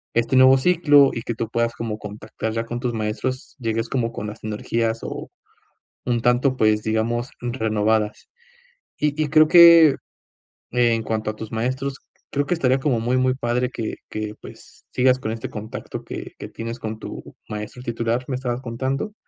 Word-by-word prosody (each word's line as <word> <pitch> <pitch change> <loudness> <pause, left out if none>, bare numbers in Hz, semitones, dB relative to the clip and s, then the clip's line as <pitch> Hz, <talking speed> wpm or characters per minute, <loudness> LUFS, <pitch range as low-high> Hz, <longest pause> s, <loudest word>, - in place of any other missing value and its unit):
este 120 +3 +1
nuevo 130 +1 +7
ciclo 145 -3 +5
y 115 - -3
que 120 - -3
tú 115 0 -3
puedas 115 0 0
como 115 -2 -4
contactar 110 +1 -6
ya 115 0 -2
con 120 +1 -4
tus 120 -1 -2
maestros, 115 +4 -3
llegues 115 -1 -2
como 120 -3 -1
con 105 -2 -5
las 105 - -9
energías 115 +1 -1
o - - -6 0.8
un 120 -1 +1
tanto, 125 +2 +2
pues, 110 -2 +3
digamos 115 +4 -1
renovadas, 110 -3 0 0.7
y 150 - +2
y 150 - 0
creo 155 +1 +5
que 170 -3 +9 0.8
en 120 -2 +2
cuanto 110 -1 -2
a - - -13
tus 110 0 -7
maestros, 130 +4 -2 0.4
creo 145 0 0
que 175 - 0
estaría 130 -5 +2
como 130 -4 +1
muy 120 +2 0
muy 130 0 +2
padre 125 0 0
que 115 -3 -4
que 105 -1 -4
pues, - - -14
sigas 130 0 +4
con 110 -4 -3
este 115 0 -5
contacto 110 +1 -7
que - - -7
que - - -7
tienes 115 +1 -6
con 110 -1 -5
tu - - -9
maestro 105 +3 -6
titular, 115 0 -1
¿me 130 - -1
estabas 125 -1 -3
contando? 135 - -3
120 Hz, 175 wpm, -22 LUFS, 110-130 Hz, 0.8 s, que